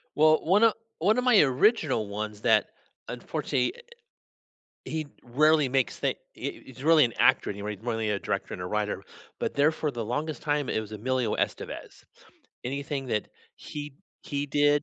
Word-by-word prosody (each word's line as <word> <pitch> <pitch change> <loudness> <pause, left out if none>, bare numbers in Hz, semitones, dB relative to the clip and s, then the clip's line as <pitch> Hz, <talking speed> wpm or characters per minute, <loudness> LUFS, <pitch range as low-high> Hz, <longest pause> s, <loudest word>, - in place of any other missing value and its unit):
Well, 155 +1 +5
one 195 +7 +4
of 225 - +6 0.3
one 210 +7 +3
of 250 - +1
my 245 -5 +6
original 135 - +2
ones 105 0 -5
that, 110 -3 +4 0.4
unfortunately, 125 -1 -2 1.1
he 160 -1 -3 0.2
rarely 150 +4 +3
makes 130 -3 0
the - - 0 0.2
he - - -6
he's 130 0 -11
really 160 -2 +7
an 120 - -1
actor - - +4
anyway. 105 +1 -4
He's 110 - -19
more 120 -2 -1
than 115 - -2
a 105 -1 0
director - - -3
and 90 - -6
a - - -4
writer, 105 +1 -2 0.4
but - - -2
there 145 +3 +4
for 155 -1 -2
the 120 -3 -4
longest 145 +7 -3
time, 145 -2 0
it - - 0
was 110 0 -9
Emilio 125 +3 -1
Estevez. - - -4 0.6
Anything 140 +1 -3
that 105 -4 -1 0.3
he 145 -2 -7 0.3
he 145 0 -3
did, 145 0 +3
135 Hz, 175 wpm, -27 LUFS, 110-155 Hz, 1.1 s, really